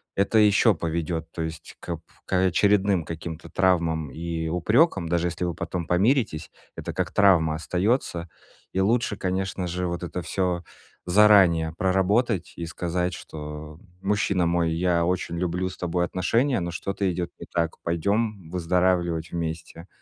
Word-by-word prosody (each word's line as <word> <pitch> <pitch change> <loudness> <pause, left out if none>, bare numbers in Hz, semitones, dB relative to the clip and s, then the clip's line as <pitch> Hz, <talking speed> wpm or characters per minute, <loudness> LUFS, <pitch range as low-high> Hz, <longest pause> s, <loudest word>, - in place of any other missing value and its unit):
это 100 +3 +3
еще 105 +1 +5
поведёт, 80 0 -3
то 80 - -4
есть, 80 0 -7
к 85 -2 -5 0.3
к - - -6
очередным 95 0 +3
каким-то 80 0 -7
травмам 85 -5 +1
и 80 0 -4
упрекам, 95 - +2
даже 85 +1 +1
если 85 - -4
вы 85 - -1
потом 85 0 -4
помиритесь, 95 - +1 0.3
это - - -5
как 90 -1 -2
травма 90 -6 +4
остается. 90 +1 -1 0.5
И 95 - 0
лучше, 110 +2 +2
конечно 95 -1 -2
же, 90 +1 -2
вот 85 0 -3
это 90 0 -4
всё 90 -2 -1 0.4
заранее 90 -5 +5
проработать 95 +2 +1
и 85 - -5
сказать, 90 +2 -2
что: 75 0 -8 0.2
"Мужчина 95 -3 +1
мой, 85 -1 +1
я 85 0 +1
очень 85 -1 -1
люблю 90 +1 -1
с - - -11
тобой 90 0 -1
отношения, 115 - +1
но 85 0 -3
что-то 95 +2 -2
идет 85 0 -3
не - - -8
так. 85 -2 -2
Пойдем 100 +2 -1
выздоравливать 85 -1 0
вместе. 85 +1 -5
90 Hz, 145 wpm, -25 LUFS, 85-95 Hz, 0.5 s, еще